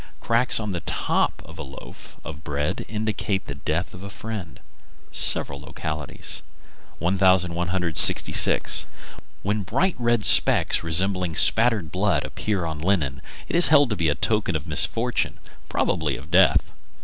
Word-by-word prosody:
Cracks 115 +1 +4
on 105 -2 -5
the 90 - -4
top - - -2
of 80 +1 -14
a - - -5
loaf 65 -2 -12
of 80 0 -10
bread 75 -1 -4
indicate 105 -2 -3
the - - -7
death 75 +5 -4
of 90 - -12
a 100 - -9
friend. 100 -5 -8 0.5
Several 70 0 +2
localities. 75 0 -5 0.6
1166. 90 -2 +2 0.6
When 105 +2 -2
bright 170 - -1
red 120 -2 0
specks - - +4
resembling 90 +1 0
spattered 105 -2 +4
blood 90 -5 -1
appear 100 -5 -4
on 80 -2 -6
linen, 80 -6 -2 0.3
it - - -4
is 175 - +8
held 145 -5 +3
to - - -1
be 85 -4 -1
a 75 - -1
token 105 0 -1
of 80 0 -4
misfortune, 115 +9 -1 0.3
probably - - -2
of 70 +6 -14
death. 95 +2 +3
90 Hz, 140 wpm, -22 LUFS, 80-105 Hz, 0.6 s, is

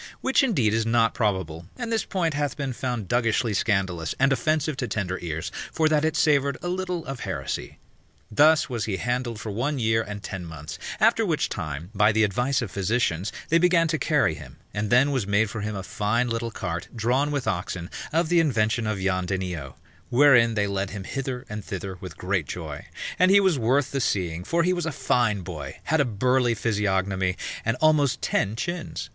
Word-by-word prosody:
Which 265 - +3
indeed 140 - +2
is 115 0 +2
not 115 0 +2
probable, 95 -7 -1
and 235 -2 -4
this 225 - 0
point 170 -5 -1
hath 145 0 -2
been 140 -3 -2
found 120 -5 -3
duggishly 115 -1 +1
scandalous 95 -5 0
and 135 0 +4
offensive 155 +3 0
to 125 - -2
tender 95 -4 -2
ears, 80 -2 -4 0.2
for 160 - +2
that 155 -1 +2
it 160 -1 +1
savoured 140 -3 +3
a 175 - -2
little 180 -2 -2
of 135 -2 -5
heresy. - - -4 0.5
Thus 155 +7 +5
was 120 -6 -2
he 100 -3 -2
handled 120 -1 -2
for 110 - -5
one 130 +8 -1
year 110 -2 +2
and 105 -2 -7
ten 95 -2 -5
months; 80 -2 -8 0.2
after - - +4
which - - 0
time, 75 +5 -5
by 105 +1 +4
the 110 +1 +3
advice 125 +6 +1
of 105 - -6
physicians, 100 -2 0 0.2
they 165 - +4
began 170 -1 +4
to 155 -1 0
carry - - +2
him, - - -11 0.2
and 105 0 -2
then 125 +5 +4
was 130 -8 -1
made 100 +1 +2
for 110 - -4
him 105 0 -3
a 95 - -4
fine 105 +6 0
little 115 0 -2
cart 85 -5 -4
drawn 125 +6 +1
with 145 -3 -2
oxen, 90 -1 -2 0.2
of 165 +1 +1
the 175 -1 +4
invention 115 -7 +1
of 110 -2 -1
Jan 95 -1 0
Denio, 90 -7 -3 0.3
wherein 120 -3 +5
they 105 -1 +2
led 100 -1 -2
him 100 0 -6
hither 130 +2 -4
and 105 -2 -6
thither 95 -1 -5
with 90 - -8
great 90 -5 -1
joy; - - -6 0.3
and 185 - +5
he 200 +1 +7
was 190 -8 +2
worth 130 +4 +2
the 135 - -1
seeing, 90 -6 -1
for 170 - +1
he 180 +2 +2
was 175 -2 -2
a - - -1
fine 115 -7 +1
boy, 75 -7 -7
had 160 0 +2
a - - +2
burly 125 +2 +2
physiognomy, 95 -4 0 0.3
and 115 +1 0
almost 155 -4 +3
ten 105 +2 0
chins. 170 +8 -4
115 Hz, 200 wpm, -25 LUFS, 95-140 Hz, 0.5 s, he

